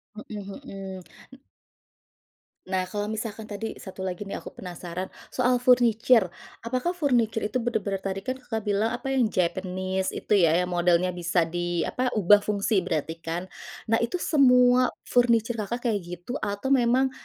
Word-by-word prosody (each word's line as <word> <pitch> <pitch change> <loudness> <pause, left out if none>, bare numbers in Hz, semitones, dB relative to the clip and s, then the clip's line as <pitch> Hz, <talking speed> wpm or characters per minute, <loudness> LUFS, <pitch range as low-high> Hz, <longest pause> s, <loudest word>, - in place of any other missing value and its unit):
Mhm 210 -1 -7 0.2
mhm. 195 -4 -7 0.3
N 265 - -13 1.3
Nah, 185 -1 -1
kalau 205 +1 -3
misalkan 220 0 -4
tadi 215 +1 -5
satu 190 0 -7
lagi 180 +2 -4
nih, 200 - -5
aku - - -11
penasaran 180 0 -6 0.2
soal 250 -1 +1
furniture. 240 -5 +4 0.3
Apakah 255 +10 -1
furniture 240 -9 +1
itu 215 +4 -1
bener-bener, 215 -5 -1
tadi 195 0 -4
kan 260 0 -3
Kakak 225 -4 -4
bilang 205 +1 +1
apa, 270 +2 -4
yang 260 -4 +3
Japanese 185 0 -1
itu - - -8 0.2
ya, 160 - +3
yang 180 - -4
modelnya 175 +1 +2
bisa 175 -1 +1
di 175 0 -2
apa, 255 0 -1
ubah 205 0 +6
fungsi 205 0 +1
berarti 165 -2 -3
kan. 170 +3 -5 0.4
Nah, 225 - +4
itu 235 +10 -1
semua 250 -6 +5 0.2
furniture 235 -2 +2
Kakak 235 +3 -1
kayak 205 - 0
gitu 180 +9 -6
atau 205 +6 -2
memang 260 0 +3
210 Hz, 155 wpm, -26 LUFS, 185-245 Hz, 1.3 s, ubah